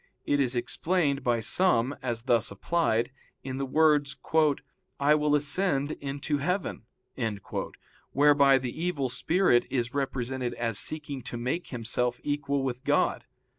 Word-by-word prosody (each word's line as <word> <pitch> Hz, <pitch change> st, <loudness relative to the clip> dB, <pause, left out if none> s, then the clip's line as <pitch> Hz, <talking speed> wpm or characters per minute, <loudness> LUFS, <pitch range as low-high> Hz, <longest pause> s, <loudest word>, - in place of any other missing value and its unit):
It 145 Hz, -, +1 dB
is 130 Hz, -2 st, +1 dB
explained 145 Hz, +2 st, 0 dB
by 120 Hz, -3 st, +1 dB
some, 130 Hz, -, +2 dB
as 120 Hz, -3 st, -3 dB
thus 120 Hz, -3 st, +2 dB
applied, 120 Hz, -, 0 dB, 0.3 s
in 130 Hz, -1 st, -5 dB
the 135 Hz, -, -2 dB
words, 150 Hz, -1 st, +3 dB, 0.8 s
"I 145 Hz, +2 st, +4 dB
will 150 Hz, -1 st, +2 dB
ascend 145 Hz, 0 st, 0 dB
into 145 Hz, +1 st, -3 dB
heaven"; 180 Hz, -, -2 dB, 1.2 s
whereby 140 Hz, -1 st, +5 dB
the 130 Hz, +4 st, -5 dB
evil 145 Hz, -7 st, -1 dB
spirit 165 Hz, -2 st, +2 dB
is 120 Hz, -2 st, -2 dB
represented 130 Hz, -2 st, -2 dB
as 115 Hz, -3 st, 0 dB
seeking 145 Hz, -3 st, -1 dB
to 120 Hz, 0 st, -6 dB
make 130 Hz, +9 st, -2 dB
himself 125 Hz, 0 st, -2 dB
equal 140 Hz, -1 st, -1 dB
with 130 Hz, -1 st, -3 dB
God. -, -, +1 dB
135 Hz, 130 wpm, -28 LUFS, 125-150 Hz, 1.2 s, whereby